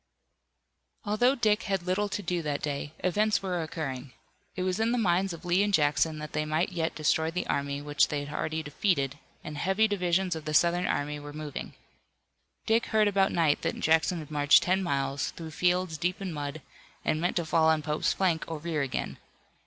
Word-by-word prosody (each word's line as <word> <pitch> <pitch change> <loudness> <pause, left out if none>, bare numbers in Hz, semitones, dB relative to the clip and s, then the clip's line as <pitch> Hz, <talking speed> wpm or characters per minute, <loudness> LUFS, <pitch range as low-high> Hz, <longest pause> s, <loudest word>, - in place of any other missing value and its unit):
Although 240 +6 +3
Dick 215 -4 +2
had 195 -3 0
little 190 +3 0
to 205 - -3
do 175 -1 -1
that 150 -2 -3
day, 145 0 -3
events 210 +3 +2
were 180 -3 -1
occurring. 135 -5 -5 0.4
It 185 - -2
was 185 +2 -1
in 225 +2 +2
the - - +1
minds 190 -3 +2
of 170 +1 -9
Lee 175 +2 +3
and 205 0 +1
Jackson 155 -1 +2
that 150 0 -7
they 150 - 0
might 155 +4 0
yet 165 -2 -2
destroy 160 +1 +1
the 180 +2 -3
army 140 0 -2
which 145 -1 +3
they 145 -1 -3
had 145 - -7
already 160 0 -2
defeated, 145 -3 0 0.2
and 150 -1 -6
heavy 195 +6 +2
divisions 185 -2 0
of 160 - -7
the 155 0 -2
Southern 175 +3 +3
army 145 +1 -1
were 145 0 -9
moving. 150 -1 -6 0.9
Dick 225 +1 +2
heard 215 -1 +3
about 195 -1 +2
night 160 -4 +2
that - - -2
Jackson 160 +3 +2
had 155 -2 -8
marched 145 -1 +5
ten 185 +2 +2
miles, 140 -5 -1
through 160 -1 -7
fields 180 -1 0
deep 180 +2 -1
in 190 -4 -4
mud, 145 0 -5 0.4
and 155 - +1
meant 175 - 0
to 170 - 0
fall 160 0 +3
on 155 -1 +2
Pope's 150 0 0
flank 175 -5 +1
or 165 - -4
rear 155 -1 -2
again. 135 -2 -3
165 Hz, 200 wpm, -28 LUFS, 150-185 Hz, 0.9 s, marched